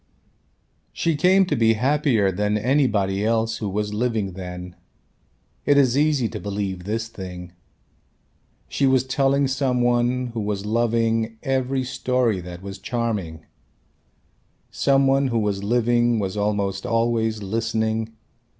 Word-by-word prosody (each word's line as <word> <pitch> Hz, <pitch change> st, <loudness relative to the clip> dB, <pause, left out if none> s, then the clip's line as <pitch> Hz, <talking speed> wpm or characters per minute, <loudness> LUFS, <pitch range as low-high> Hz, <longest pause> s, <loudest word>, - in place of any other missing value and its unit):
She 165 Hz, -2 st, 0 dB
came 185 Hz, +6 st, +4 dB
to -, -, -1 dB
be 115 Hz, -1 st, +4 dB
happier 125 Hz, -4 st, +2 dB
than 105 Hz, +3 st, 0 dB
anybody 105 Hz, -6 st, +1 dB
else 115 Hz, 0 st, 0 dB
who 105 Hz, -3 st, -3 dB
was 105 Hz, +1 st, -2 dB
living 110 Hz, -3 st, -1 dB
then. 90 Hz, -1 st, -8 dB, 0.9 s
It 145 Hz, -1 st, +3 dB
is 130 Hz, -3 st, +4 dB
easy 145 Hz, -4 st, +2 dB
to -, -, -6 dB
believe 100 Hz, -3 st, -4 dB
this 110 Hz, +2 st, -2 dB
thing. 90 Hz, -4 st, -8 dB, 1.2 s
She 140 Hz, -, +1 dB
was 130 Hz, -1 st, +3 dB
telling 135 Hz, +1 st, +1 dB
some 130 Hz, -1 st, 0 dB
one, 120 Hz, +1 st, +1 dB
who 115 Hz, -, -3 dB
was 105 Hz, -1 st, -3 dB
loving 115 Hz, 0 st, 0 dB
every 130 Hz, 0 st, 0 dB
story 125 Hz, -5 st, 0 dB
that 90 Hz, +1 st, -9 dB
was 100 Hz, 0 st, -7 dB
charming. 105 Hz, -10 st, -3 dB, 1.3 s
Some 135 Hz, 0 st, +2 dB
one 135 Hz, +1 st, +3 dB
who 120 Hz, -2 st, -1 dB
was 100 Hz, -2 st, -1 dB
living 120 Hz, +1 st, +2 dB
was 95 Hz, -2 st, -2 dB
almost 100 Hz, -2 st, -1 dB
always 115 Hz, -2 st, 0 dB
listening. 110 Hz, +1 st, -1 dB
115 Hz, 130 wpm, -23 LUFS, 105-125 Hz, 1.3 s, came